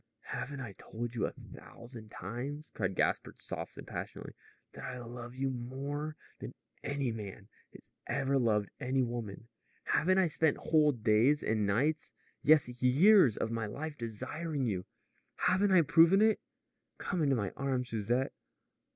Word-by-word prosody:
"Haven't 140 0 -4
I 120 -5 -6
told 120 +1 -5
you 120 - 0
a - - -5
thousand 115 -2 -12
times," 125 - -6
cried 95 -3 -2
Gaspard - - 0
softly - - -6
and - - -13
passionately, - - -6 0.4
"that - - -10
I 125 - -5
love 120 0 -8
you 135 0 -1
more 140 +5 -4 0.2
than - - -7 0.3
any 140 -3 -1
man 105 -1 -8 0.2
has - - -16 0.2
ever 135 0 +1
loved 105 -4 +1
any 130 +1 +1
woman? 115 -3 -5 0.4
Haven't 185 +5 +2
I 190 -2 +4
spent 155 -1 +2
whole 155 -2 +3
days 120 +4 +3
and 110 -2 +1
nights 145 +10 0 0.3
yes, 150 -2 +5
years 140 - +6
of 110 - -1
my 115 -2 -2
life 155 +8 -5
desiring 130 +6 -3
you? 95 -5 -2 0.5
Haven't 190 +3 +2
I 185 -3 +6
proven 165 +5 +6
it? 220 0 +4 0.6
Come 180 -3 -2
into 140 -3 +3
my 100 -5 -1
arms, 130 -2 -1
Susette. 115 +4 0
130 Hz, 150 wpm, -32 LUFS, 115-150 Hz, 0.6 s, years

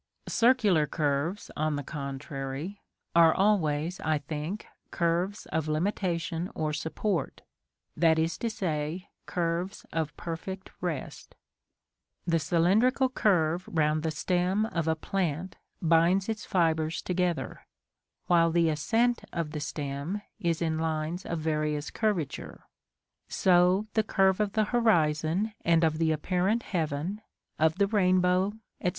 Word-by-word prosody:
Circular 220 -10 +3
curves, 150 +7 -1
on 155 0 0
the 145 - -3
contrary, 140 +5 -5 0.3
are 165 -1 +6
always, 175 -4 +1
I 155 -1 +1
think, 150 +7 -5 0.2
curves 175 +4 -1
of 155 0 -1
limitation 170 +1 -1
or 155 -1 -1
support; 160 +2 -2 0.5
that 165 -1 +4
is 160 +1 +1
to 235 - -1
say, 170 -3 -3 0.2
curves 175 +2 -2
of 160 -2 -2
perfect 185 +3 -6
rest. 170 -6 -5 0.9
The 165 -1 +2
cylindrical 200 - +3
curve 180 -7 +1
round 155 -2 +2
the 160 - -1
stem 180 +6 0
of 170 -7 -2
a 160 - +2
plant 175 0 -2 0.3
binds 170 +4 +4
its 220 -1 -4
fibres 160 -3 +1
together; 175 -8 -2 0.6
while 170 -1 +4
the 165 0 +3
ascent 225 +11 +1
of 165 -3 -3
the 150 - -4
stem 145 +6 -4 0.2
is 170 -4 0
in 160 -1 0
lines 160 +2 -2
of 170 - -2
various 150 -1 -1
curvature: 205 - -2 0.7
so 180 +2 +4
the 220 - +3
curve 190 -2 +2
of 205 -1 0
the 220 - +3
horizon 175 -3 +2
and 165 0 +3
of 155 -1 +2
the 160 -1 +2
apparent 185 +8 0
heaven, 165 +3 -2 0.4
of 160 0 +3
the 200 - +3
rainbow, 185 -1 +2 0.3
etc. 180 - +1
170 Hz, 130 wpm, -28 LUFS, 155-190 Hz, 0.9 s, are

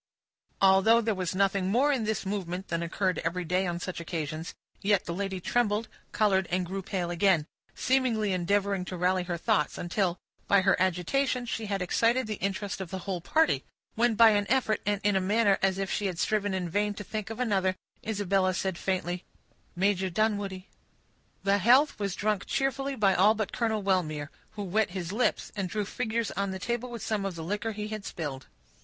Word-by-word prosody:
Although 195 +5 +6
there 225 -1 0
was 185 -2 -3
nothing 195 -1 +2
more 260 +8 +3
in 255 -6 0
this 215 -2 -1
movement 190 -1 -3
than 170 -1 -1
occurred 180 +2 -1
every 175 +2 -2
day 185 +3 +1
on 170 0 -2
such 180 0 -5
occasions, 160 -1 -4 0.3
yet 200 -1 +2
the 170 - -3
lady 190 0 -3
trembled, 220 +2 0 0.2
colored, 190 -4 +2
and 180 +1 0
grew 190 +3 -4
pale 180 -2 -3
again, 175 -3 +3 0.3
seemingly 235 -6 +1
endeavoring 195 +1 +1
to 180 - -5
rally 180 +1 +2
her 175 -1 -2
thoughts, 215 +4 +1
until, 180 0 -1 0.3
by 200 -1 +5
her 195 +1 +4
agitation, 240 +9 +1
she 225 -2 -3
had 195 -2 -1
excited 230 +7 +2
the 215 -1 -4
interest 195 0 -2
of 185 - -5
the 190 - -4
whole 185 -3 -2
party; 320 - +2 0.3
when 235 0 +2
by 225 0 +7
an 205 -1 +1
effort, 240 -4 +2
and 205 -1 +1
in 205 -1 +2
a 190 - +3
manner 205 +1 +3
as 190 -1 +2
if 195 -1 -2
she 205 - 0
had 180 -3 -4
striven 205 +1 0
in 180 -2 -2
vain 205 +4 0
to 205 - -6
think 215 +1 -5
of 225 - -6
another, 195 -6 +1 0.3
Isabella 195 -3 +1
said, 190 -2 -2
faintly,— 180 -1 -2 0.5
"Major 190 0 +1
Dunwoodie." 200 -1 -1 0.8
The 200 0 +3
health 255 +6 +4
was 200 -3 -2
drunk 210 -1 -1
cheerfully 270 0 -1
by 200 -5 +3
all 205 +5 +5
but 215 -2 -3
Colonel 220 -3 0
Wellmere, 155 -6 0 0.2
who 210 - -5
wet 210 +3 +1
his 180 -1 -4
lips, 245 +3 0
and 195 -3 -2
drew 210 +2 -2
figures 230 +1 -2
on 200 +1 -2
the 190 - -4
table 240 +5 -3
with 235 -3 -7
some 215 -2 -1
of 195 -3 -3
the 165 - -6
liquor 210 +5 -2
he 210 0 -5
had 215 -1 -5
spilled. 145 -8 -5
195 Hz, 200 wpm, -28 LUFS, 185-215 Hz, 0.8 s, by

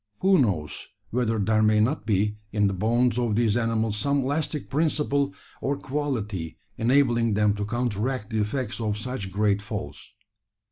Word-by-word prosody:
Who 190 -1 +5
knows 90 - -1 0.2
whether 115 -2 0
there 110 +1 +2
may 110 0 +4
not 110 +1 0
be 105 0 +1
in 105 -1 +2
the 100 - +2
bones 120 +5 +1
of 115 -4 0
these 115 -2 +2
animals 115 -2 0
some 140 +5 +1
elastic 150 +2 -2
principle 145 -2 0 0.3
or 140 +1 -1
quality 110 - -3 0.2
enabling 120 -3 +2
them 105 -1 +3
to 105 - -2
counteract 120 0 -2
the 110 -1 +1
effects 115 +2 -2
of 105 -2 -1
such 110 -4 -4
great 100 +1 +1
falls? 95 -10 -7
115 Hz, 155 wpm, -25 LUFS, 105-130 Hz, 0.3 s, Who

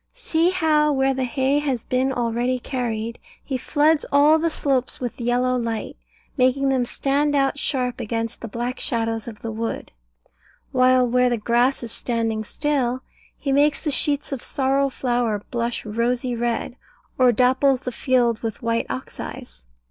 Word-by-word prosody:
See 330 +2 +1
how, 310 -5 +2
where 270 -1 +2
the 260 -1 -1
hay 265 +3 +1
has 270 -6 -2
been 260 +1 +1
already 245 0 0
carried, 235 -3 -3 0.2
he 270 - -4
floods 295 +4 +2
all 295 +3 +5
the 330 +1 +1
slopes 270 -5 -1
with 245 0 -5
yellow 250 +1 +1
light, 230 -2 -3 0.4
making 265 +1 +2
them 260 -2 +1
stand 285 +4 0
out 275 0 +1
sharp 250 -4 -1
against 230 +1 -3
the 230 - -5
black 240 +4 -4
shadows 225 -2 -1
of 220 -3 -9
the 225 - -3
wood; 225 +1 -4 0.8
while 255 0 +4
where 250 +1 +3
the 240 - 0
grass 240 +4 +1
is 230 - -6
standing 225 -3 -2
still, 260 -1 -1 0.3
he 275 - -2
makes 285 +1 +3
the 300 - 0
sheets 285 +1 +1
of 270 -3 -3
sorrel 275 0 +1
flower 240 -5 -1
blush 235 -1 -2
rosy 240 +3 -1
red, 235 +1 -2 0.4
or 255 -1 +6
dapples 260 +2 +3
the 250 - -4
field 240 -3 +1
with 225 0 -5
white 230 0 0
oxeyes. - - -7
250 Hz, 160 wpm, -23 LUFS, 235-275 Hz, 0.8 s, or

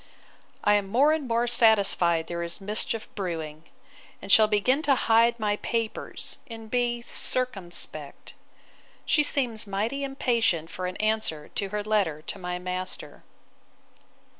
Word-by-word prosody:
I 210 - +4
am 205 -1 +1
more 270 +9 +4
and 310 -4 -2
more 235 0 +1
satisfied 200 -8 +4
there 170 0 -5
is 170 0 0
mischief 210 +2 -2
brewing; 160 -5 -5 0.5
and 195 - -5
shall 215 +1 +7
begin 220 +7 +2
to 285 -4 +3
hide 235 0 +3
my 210 -1 0
papers, 230 -1 -4
and 225 -2 -10
be 240 -1 0
circumspect. 175 - -1 0.7
She 300 - +3
seems 245 -7 0
mighty 220 +8 -2
impatient 230 - 0
for 185 0 -4
an 180 - -6
answer 215 -8 -1
to 200 - -4
her 210 +1 -3
letter 195 -8 0
to - - -7
my 180 -1 -4
master. 185 +1 -5
215 Hz, 140 wpm, -26 LUFS, 180-235 Hz, 0.7 s, shall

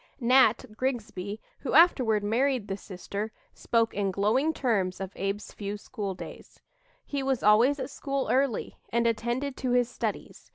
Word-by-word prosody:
"Nat" 250 -1 +4
Grigsby, 220 -5 -3 0.2
who 265 - -4
afterward 255 -11 +5
married 245 +1 +1
the 195 - -2
sister, 200 +2 -6 0.2
spoke 230 -1 +1
in 200 -1 0
glowing 215 +11 +2
terms 210 -11 0
of 190 -1 -5
Abe's 195 +2 -3
few 205 0 -5
school 205 -3 -5
days: - - -11 0.5
"He 285 -1 -3
was 265 -2 0
always 235 +7 +5
at 260 +1 -4
school 275 -1 -2
early, 265 -3 0
and 235 0 +1
attended 240 +4 -1
to 255 -2 -1
his 245 -1 +2
studies. - - -5
230 Hz, 155 wpm, -28 LUFS, 205-260 Hz, 0.5 s, afterward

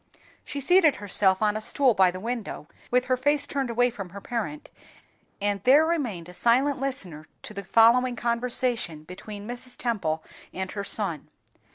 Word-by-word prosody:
She 285 - -5
seated 320 0 +5
herself 195 0 +1
on 210 0 +2
a 215 - -3
stool 260 +3 +3
by 190 -3 +4
the 185 +1 -6
window, 230 -6 -5 0.2
with 250 +1 +2
her 255 0 +2
face 290 +3 +1
turned 275 -3 -2
away 245 +1 +2
from 195 -6 -7
her 200 +3 -9
parent, 240 +8 -5 0.7
and 205 -1 -1
there 285 +5 +6
remained 245 - -2
a 180 - -11
silent 250 +9 +2
listener 185 - -3 0.2
to - - -8
the 200 -1 -6
following 235 +5 +4
conversation 235 -8 -1
between 200 +4 -9
Mrs. 245 +1 -6
Temple 195 -10 -2 0.3
and 190 0 -4
her 200 - -4
son. 195 -7 -2
230 Hz, 170 wpm, -26 LUFS, 195-255 Hz, 0.7 s, there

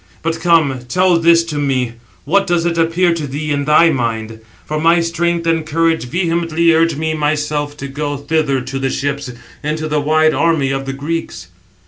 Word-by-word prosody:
But 165 0 -2
come, 165 -6 +2
tell 180 +2 +3
this 165 0 +4
to 155 -3 -4
me, 130 -4 0 0.3
what 195 +7 +2
does 175 -1 +1
it 170 -1 0
appear 170 +2 +2
to 160 -3 -4
thee 150 +3 -4
in 145 -1 -1
thy 160 +3 +5
mind? 115 -4 -3 0.3
For 155 0 -3
my 165 +2 +4
strength 170 0 -1
and 165 -1 +1
courage 160 -1 0
vehemently 170 +1 +1
urge 165 0 +2
me 160 +1 -2
myself 150 -1 -2
to 140 - -6
go 145 +1 -4
thither 145 -2 0
to 130 +2 -5
the 135 0 -1
ships, 140 -1 -3 0.3
into 155 +1 -2
the 150 -1 0
wide 155 +1 +3
army 160 -5 +1
of 135 0 -3
the 135 - -3
Greeks." 145 - -5
155 Hz, 185 wpm, -16 LUFS, 140-165 Hz, 0.3 s, thy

